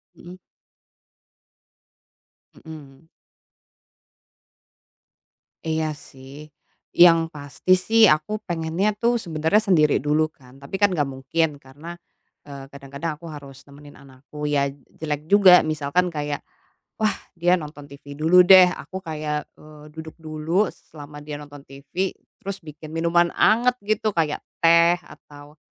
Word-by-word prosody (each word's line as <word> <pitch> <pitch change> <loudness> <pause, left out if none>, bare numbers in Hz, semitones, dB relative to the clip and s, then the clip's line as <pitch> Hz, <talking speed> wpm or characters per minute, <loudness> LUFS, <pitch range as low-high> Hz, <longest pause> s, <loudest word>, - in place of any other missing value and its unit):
Hmm. 180 +1 -13 2.3
Hmm. 155 -1 -13 2.6
Iya 160 -1 -1
sih, 140 0 -13 0.5
yang 165 -2 +6
pasti 150 +4 0
sih 220 +4 +4
aku 155 +8 +1
pengennya 175 +4 -1
tuh 235 +3 0
sebenarnya 160 +1 0
sendiri 155 -6 +3
dulu 155 +2 0
kan, 130 -3 -20
tapi 140 +8 -8
kan 205 - +5
nggak 145 -4 -1
mungkin 145 +3 -2
karena, 150 +6 -12 0.5
eee, 140 -1 -9
kadang-kadang 140 +3 -6
aku 170 - -11
harus 140 -3 -12
nemenin 145 0 -15
anakku, 140 +2 -9
ya 140 -1 0
jelek 150 +2 -7
juga 190 -2 +7
misalkan 155 +4 0
kayak, 145 -1 -3 0.6
wah 215 - +3 0.2
dia 175 +1 +2
nonton 150 -3 -10
TV 140 0 -12
dulu 165 +5 +4
deh 185 -1 +8
aku 190 +1 -8
kayak, 150 -3 -5
eee, 150 0 -15
duduk 160 +1 -10
dulu 160 +5 -1
selama 145 -1 -13
dia 150 -1 -7
nonton 145 -1 -13
TV 140 +8 -5 0.2
terus 200 -2 -7
bikin 155 0 -11
minuman 170 +1 +1
hangat 240 +3 +3
gitu, 215 +1 -1
kayak 160 -4 -2 0.2
teh 170 +1 +5
atau, 145 -2 -16
155 Hz, 125 wpm, -22 LUFS, 145-175 Hz, 2.6 s, deh